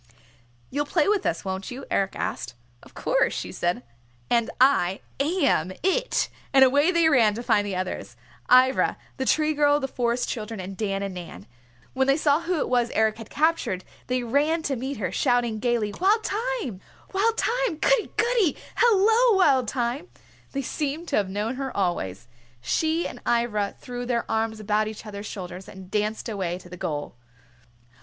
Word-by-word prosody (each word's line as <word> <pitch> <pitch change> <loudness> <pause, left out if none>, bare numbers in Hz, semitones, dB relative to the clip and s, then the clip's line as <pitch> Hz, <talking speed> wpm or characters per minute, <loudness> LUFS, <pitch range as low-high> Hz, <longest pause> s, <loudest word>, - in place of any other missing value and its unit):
"You'll 290 +2 -1
play 310 0 +2
with 410 -2 +2
us, 165 - -2
won't 190 0 -4
you?" 260 +2 -7
Eric 195 0 0
asked. - - -4 0.3
"Of - - -18
course," - - +1
she - - -4
said, 175 -7 -1 0.5
"and 235 -1 +3
I 200 -9 +3 0.2
am 280 - +1
It!" 480 +7 +1 0.2
And 270 -1 +7
away 285 +5 +4
they 340 -2 +4
ran 235 -9 +4
to 235 - -5
find 205 -3 +2
the 195 - -3
others, 185 0 -4 0.3
Ivra, 255 +1 +5 0.2
the 265 - -2
Tree 310 +3 +2
Girl, 290 0 +3
the 270 - -2
Forest 245 -1 -1
Children, 220 -2 -4
and 190 +1 -6
Dan 195 -1 -2
and 195 -1 -4
Nan. 170 - -9 0.5
When 265 0 +1
those 275 +3 +3
saw 295 +1 +3
who 350 0 -1
it - - 0
was 245 -1 +2
Eric 220 0 +2
had 225 - -9
captured 310 - 0 0.2
they 250 0 0
ran 295 +7 +1
to 280 -3 -1
meet 265 +2 -4
her, 190 -4 -2
shouting 245 -4 +1
gayly, 230 -3 0
"Wild 420 +4 +4
Thyme! 425 - -2 1.0
Goody! - - +2
Goody! 445 - +2 0.2
Hello, 450 0 +5
Wild 270 - +4
Thyme!" 250 +6 -2 0.4
They 275 0 -3
seemed 305 +5 -3
to 280 - +1
have 200 -2 +1
known 210 +6 -2
her 270 -4 -4
always. 120 - -2 0.3
She 320 - 0
and 245 - -10
Ivra 235 -4 0
threw 245 0 -6
their 240 -2 0
arms 220 0 -1
about 215 0 +1
each 215 +1 -8
other's 205 0 -7
shoulders 185 -1 -7
and 190 -1 -12
danced 215 +2 -1
away 190 -6 -2
to 180 -1 -14
the 180 - -8
goal. 145 -3 -4
245 Hz, 175 wpm, -25 LUFS, 205-295 Hz, 1.0 s, And